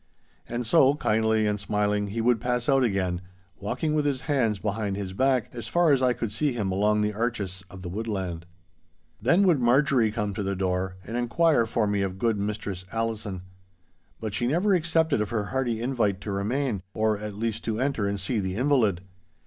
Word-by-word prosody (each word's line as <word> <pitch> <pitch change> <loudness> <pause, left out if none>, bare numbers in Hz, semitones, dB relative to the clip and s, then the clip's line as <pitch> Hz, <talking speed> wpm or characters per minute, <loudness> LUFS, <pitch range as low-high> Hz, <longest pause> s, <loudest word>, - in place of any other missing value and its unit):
And 120 +1 -3
so, 140 +2 +5
kindly 110 -4 +2
and 105 0 0
smiling, 105 0 0
he 110 +3 -3
would 120 -1 +2
pass 125 -1 -1
out 135 -2 +4
again, 95 -5 0 0.4
walking 150 - -2
with 150 -1 +2
his 140 -3 0
hands 125 -8 +1
behind 105 0 -2
his 95 -2 -4
back 130 +1 +1
as 115 -2 -6
far 170 +4 +3
as 135 -2 +3
I 130 -1 +4
could 115 -3 -4
see 140 +5 0
him 105 -5 -2
along 105 +2 +2
the 105 0 0
arches 105 -5 -2
of 95 -2 -11
the - - -5
woodland. 95 -4 -4 0.7
Then 170 - +4
would 170 -7 +4
Marjorie 125 -1 +3
come 105 -1 -2
to 105 - -3
the 100 0 -1
door, 90 0 -1
and 115 - -5
inquire 120 +1 +2
for 110 0 +1
me 100 -1 0
of 95 -1 -2
good 110 0 +1
Mistress 100 -2 -3
Allison. 110 -5 -3 0.8
But 110 -2 -4
she 120 - 0
never 180 +9 +2
accepted 160 - +2
of 105 - -2
her 110 -3 -1
hearty 120 0 -2
invite 115 -7 0
to 100 - -4
remain—or, 105 -1 -1
at 105 -1 -6
least, 115 +1 -3
to 110 -1 -1
enter 130 -6 0
and 100 0 -2
see 105 +5 -1
the 95 -2 -2
invalid. 115 -8 +2
110 Hz, 195 wpm, -26 LUFS, 100-125 Hz, 0.8 s, so